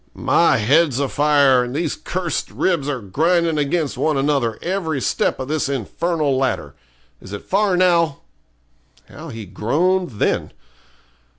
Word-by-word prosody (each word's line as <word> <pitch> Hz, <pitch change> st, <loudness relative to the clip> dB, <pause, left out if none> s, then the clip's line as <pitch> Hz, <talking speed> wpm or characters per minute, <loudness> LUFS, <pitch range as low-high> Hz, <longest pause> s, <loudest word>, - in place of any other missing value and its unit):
'My 170 Hz, -6 st, +3 dB
head's 140 Hz, +4 st, +2 dB
a 140 Hz, -, 0 dB
fire, 140 Hz, -3 st, +3 dB
and 125 Hz, +2 st, -6 dB
these 160 Hz, -1 st, -1 dB
cursed 180 Hz, -1 st, -3 dB
ribs 165 Hz, -7 st, -1 dB
are 135 Hz, -4 st, -3 dB
grinding 165 Hz, -, +1 dB
against 150 Hz, +1 st, -1 dB
one 155 Hz, -2 st, +1 dB
another 135 Hz, -5 st, 0 dB
every 170 Hz, -5 st, -2 dB
step -, -, 0 dB
of 130 Hz, -, -4 dB
this 150 Hz, -1 st, -1 dB
infernal 145 Hz, -, -1 dB
ladder. 135 Hz, 0 st, -1 dB, 0.5 s
Is 95 Hz, -, -11 dB
it 100 Hz, -, -6 dB
far 195 Hz, -1 st, +1 dB
now?' 170 Hz, -5 st, +2 dB, 0.9 s
How 160 Hz, +2 st, -10 dB
he 115 Hz, -4 st, -7 dB
groaned 150 Hz, -, 0 dB
then! 105 Hz, -, -1 dB
150 Hz, 140 wpm, -20 LUFS, 130-170 Hz, 0.9 s, My